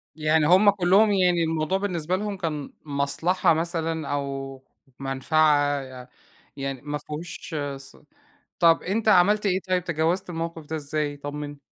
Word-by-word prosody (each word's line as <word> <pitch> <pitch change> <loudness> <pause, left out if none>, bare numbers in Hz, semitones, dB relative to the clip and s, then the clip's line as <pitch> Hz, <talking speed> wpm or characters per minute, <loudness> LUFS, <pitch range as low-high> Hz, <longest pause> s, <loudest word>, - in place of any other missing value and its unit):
يعني 155 0 +2
هم 190 +5 +6
كُلّهم 200 +2 +4
يعني 180 -3 +3
الموضوع 160 +3 0
بالنسبة 180 -3 -2
لهم 205 0 -3
كان 155 -6 -4
مَصلحة 145 +6 +1
مثلًا 165 -2 -2
أو 135 -1 -4 0.4
مَنفعة 145 +1 +2 0.2
ي - - -27 0.5
يعني 135 -2 -4
ما 150 0 -4
فيهوش 155 +2 -8 0.2
ص 135 -1 -12 0.6
طَب 165 -2 +4
أنت 220 +4 -1
عملت 210 +2 +4
إيه 190 -1 +1
طيب 180 -1 +1
تجاوزت 170 +3 -1
الموقِف 165 -2 -5
ده 160 - -4
إزاي 150 -1 -3
طمّنّي؟ 145 0 -6
160 Hz, 140 wpm, -25 LUFS, 145-180 Hz, 0.6 s, هم